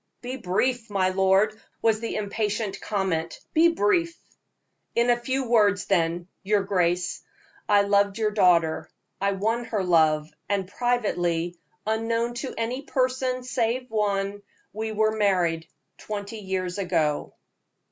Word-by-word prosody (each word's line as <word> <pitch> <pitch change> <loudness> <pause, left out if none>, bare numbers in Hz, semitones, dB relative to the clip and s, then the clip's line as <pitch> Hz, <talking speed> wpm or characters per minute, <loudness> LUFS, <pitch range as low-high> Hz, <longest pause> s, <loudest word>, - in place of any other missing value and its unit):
"Be 250 +2 -4
brief, 235 +2 -1
my 190 -2 +2
lord," 190 +3 +2 0.2
was 220 -1 +3
the 230 - -4
impatient 210 -1 -2
comment. 185 -5 -2
"Be 325 +2 +6
brief." 335 - +1 0.8
"In 235 +1 +4
a - - +5
few 260 +2 -2
words, 210 -4 +3
then, 170 -2 +1
your 205 0 +1
grace, 180 -2 0 0.5
I 205 -1 +5
loved 200 0 +2
your 215 -1 +1
daughter. 175 -6 +3 0.3
I 200 0 +2
won 225 +5 -1
her 210 -4 -1
love, 155 -3 +3 0.2
and 200 -2 0
privately, 175 -8 -1 0.3
unknown 230 +2 0
to 265 - -4
any 240 +4 -2
person, 255 -1 -1
save 250 0 -1
one, 205 -2 0 0.3
we 220 +1 -3
were 215 0 +1
married 175 -6 +1 0.3
twenty 210 +1 -5
years 190 -1 -3
ago." 165 -6 0
205 Hz, 130 wpm, -25 LUFS, 185-230 Hz, 0.8 s, Be